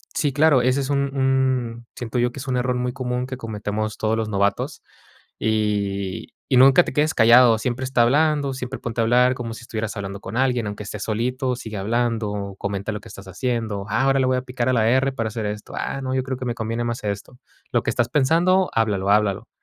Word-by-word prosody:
Sí, 145 -4 0
claro, 150 -3 +4
ese 130 +3 +2
es 135 - -4
un 140 -1 0
un 130 -3 0
siento 120 -1 -3
yo, 120 0 +1
que 135 - -9
es 135 - -7
un 125 -1 0
error 125 0 0
muy 125 0 -2
común 125 -2 -2
que 130 -1 -6
cometemos 110 -1 -4
todos 110 +1 0
los 110 - -1
novatos 100 0 -1 0.6
y 100 -3 -1 0.2
y 130 - +5
nunca 135 +6 +7
te - - -5
quedes 155 +1 +2
callado. 115 0 +6
Siempre 125 +2 -2
está 130 -2 +2
hablando, 145 +1 +2
siempre 130 0 -5
ponte 115 -1 -3
a - - +3
hablar 125 +2 +4
como 115 -2 -5
si 115 - -10
estuvieras 110 -2 -4
hablando 100 0 -5
con - - -7
alguien, 125 -3 +1
aunque 105 +1 -6
esté 105 - -6
solito, 125 +4 -1
sigue 110 -4 -7
hablando, 115 +1 0
o 100 -1 -5
comenta 100 +1 -3
lo 105 - -5
que 115 - -13
estás 100 0 -11
haciendo, 110 -1 -2
ah, 110 +5 +1
ahora 135 0 +3
le 130 - +2
voy 130 0 +2
a - - -1
picar 125 -1 -3
a - - +2
la 115 -2 +3
erre 130 +2 +3
para 115 -4 -2
hacer 110 -1 -4
esto, 105 0 -6
ah, 135 - -3
no, 130 0 -2
yo 130 - 0
creo 130 -1 -4
que 130 - -5
me 120 0 -2
conviene 115 +1 -3
más 120 -1 -3
esto. 105 +4 -5 0.3
Lo - - +1
que - - 0
estás 120 0 0
pensando, 170 +7 +3
háblalo, 100 -3 0
háblalo, 105 -2 +2
120 Hz, 230 wpm, -22 LUFS, 110-130 Hz, 0.6 s, nunca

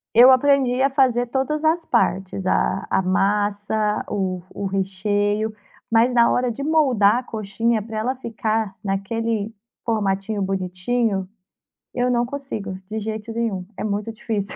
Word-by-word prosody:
Eu 245 +3 +9
aprendi 260 -1 +3
a 275 - +4
fazer 255 -3 +2
todas 270 +5 -1
as 325 +2 +2
partes. 190 - 0
A 190 +1 +1
a - - +2
massa, 205 +2 0
o 185 -3 -2
o 200 - -3
recheio, 205 +3 0 0.4
mas 230 +2 +4
na 235 -1 +5
hora 250 0 +1
de 255 +5 -5
moldar 260 -9 +4
a - - -3
coxinha 220 0 -1
pra 220 +1 -6
ela 250 +5 -1
ficar 220 -4 -2
naquele 215 +2 -2 0.3
formatinho 205 -2 -1
bonitinho, 190 +2 -1 0.7
eu 245 0 +1
não 240 -1 +2
consigo, 240 -8 -5
de 220 +1 -4
jeito 220 +1 -5
nenhum, 225 -5 -2
é - - -4
muito 210 +1 -2
difícil. 215 -2 -4
220 Hz, 145 wpm, -22 LUFS, 200-245 Hz, 0.7 s, Eu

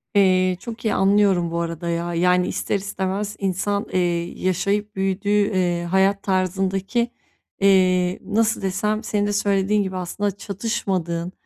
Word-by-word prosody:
Eee, 185 -2 +4
çok 235 +1 -8
iyi 215 - +2
anlıyorum 195 -3 +3
bu 170 - -1
arada 170 0 -3
ya. 170 +1 -2
Yani, 180 +1 +2
ister - - -2
istemez 200 +1 -3
insan, 200 +2 -1
eee, 185 - +2 0.4
yaşayıp 200 +3 0
büyüdüğü, 195 +1 -1
eee, 185 -4 +1
hayat 190 +3 +2
tarzındaki, 195 +5 0 0.5
eee, 185 -2 +3
nasıl 220 +3 +1
desem, 210 +3 -1
senin 205 -2 0
de 205 - -1
söylediğin 200 0 +1
gibi 190 -1 -5
aslında 200 +3 -2
çatışmadığın, 185 -4 -3
195 Hz, 135 wpm, -22 LUFS, 180-205 Hz, 0.5 s, Eee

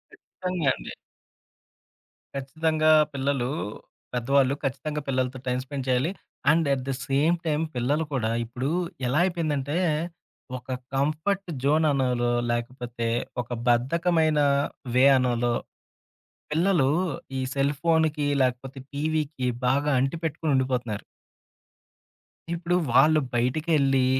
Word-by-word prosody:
ఇచ్చితంగా 180 -5 -4
అండి. - - -8 1.4
ఖచ్చితంగా 155 +3 +1 0.2
పిల్లలు 135 -2 0 0.6
పెద్దవాళ్ళు 135 +2 +2
ఖచ్చితంగా 145 +3 -2
పిల్లలతో 130 -1 -1
టైమ్ 125 0 0
స్పెండ్ 135 -1 -6
చేయాలి. 130 +7 +2 0.4
And 160 0 +2
at 130 -2 -2
the 135 - 0
same 145 +5 +3
time 155 0 +1
పిల్లలు 140 +6 +1
కూడా 115 -5 0 0.2
ఇప్పుడు 125 +4 -3 0.4
ఎలా 135 +6 +2
అయిపోయిందంటే, 155 -5 -1 0.8
ఒక 125 - -14 0.3
కంఫర్ట్ 155 +8 0
జోన్ 155 +3 +3
అనాలో 125 -3 +1 0.2
లేకపోతే 120 0 -3 0.3
ఒక 120 - -11 0.2
బద్ధకమైన 155 +5 +2 0.6
వే 130 +1 +6
అనాలో, 120 -1 +1 1.0
పిల్లలు 165 -3 +3 0.5
ఈ - - -1 0.2
సెల్‌ఫోన్‌కి 150 +2 +1
లేకపోతే 130 +1 -1
టీవీకి 150 -2 -1 0.2
బాగా 145 +3 +2
అంటి 135 +5 0
పెట్టుకొని 155 -1 -1
ఉండిపోతున్నారు. 125 -5 -1 1.5
ఇప్పుడు 175 +1 -1 0.2
వాళ్ళు 155 +5 +6 0.2
బయటికెళ్ళి, 135 +1 +2
140 Hz, 100 wpm, -26 LUFS, 125-155 Hz, 1.5 s, వే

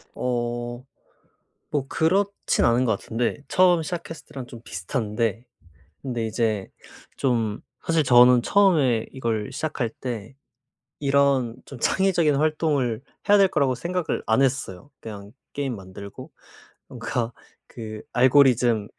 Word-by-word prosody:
어. 120 0 -3 0.9
뭐 140 -3 -1
그렇진 195 +7 +1
않은 120 +2 +3
것 115 - +2
같은데 115 +1 -2
처음 180 -2 +4
시작했을 165 -1 -6
때랑 130 -2 -7
좀 120 -2 -11
비슷한데 110 +3 -2 0.6
근데 120 -4 -3
이제 110 -3 -1 0.5
좀 115 -5 0 0.2
사실 165 -2 +2
저는 125 -1 +6
처음에 145 - +3
이걸 115 -5 -2
시작할 145 -6 -2
때 120 0 -5 0.6
이런 140 -4 +2
좀 135 - -10
창의적인 170 -3 +2
활동을 145 -6 0 0.3
해야 205 - +6
될 195 - +6
거라고 140 -7 +1
생각을 175 +6 -2
안 110 +5 +3
했어요. 135 -2 -2
그냥 100 -2 -9 0.2
게임 140 -4 -2
만들고 95 0 -10 0.6
뭔가 120 -1 -3 0.3
그 110 -2 -8
알고리즘 125 -4 +4
125 Hz, 250 characters per minute, -24 LUFS, 115-145 Hz, 0.9 s, 저는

